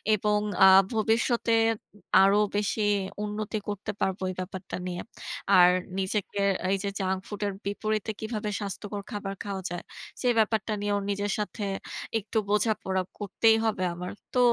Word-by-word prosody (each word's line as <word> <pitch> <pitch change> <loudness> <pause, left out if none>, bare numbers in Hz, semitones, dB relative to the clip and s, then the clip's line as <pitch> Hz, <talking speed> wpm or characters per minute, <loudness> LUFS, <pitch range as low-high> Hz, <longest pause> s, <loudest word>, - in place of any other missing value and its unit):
এবং 210 0 +1 0.3
আ - - +10 0.3
ভবিষ্যতে 230 +1 +2 0.7
আরো 195 +1 +5 0.2
বেশি 210 +1 0 0.4
উন্নতি 210 +1 -3
করতে 205 +1 -3
পারবো 190 0 0
এই - - -8
ব্যাপারটা 185 0 -5
নিয়ে। 175 -1 -3 0.6
আর 180 0 +8 0.3
নিজেকে 195 +1 -2 0.3
এই 195 - +3
যে 200 - 0
junk 190 -1 0
food 205 -1 -7
এর 200 - -2
বিপরীতে 215 +2 -1
কিভাবে 215 -1 -3
স্বাস্থ্যকর 205 0 -4
খাবার 205 -2 -4
খাওয়া 200 -2 -4
যায় 175 0 -5 0.4
সে 250 - +1
ব্যাপারটা 220 0 +1
নিয়ে 205 0 0 0.2
নিজের 205 0 -1
সাথে 210 +1 -3 0.6
একটু 215 +2 -4
বোঝাপড়া 210 -3 +1 0.2
করতেই 220 +2 +3
হবে 215 -4 0
আমার। 180 +1 -5 0.2
তো 250 - +2
205 Hz, 145 wpm, -28 LUFS, 195-215 Hz, 0.7 s, আ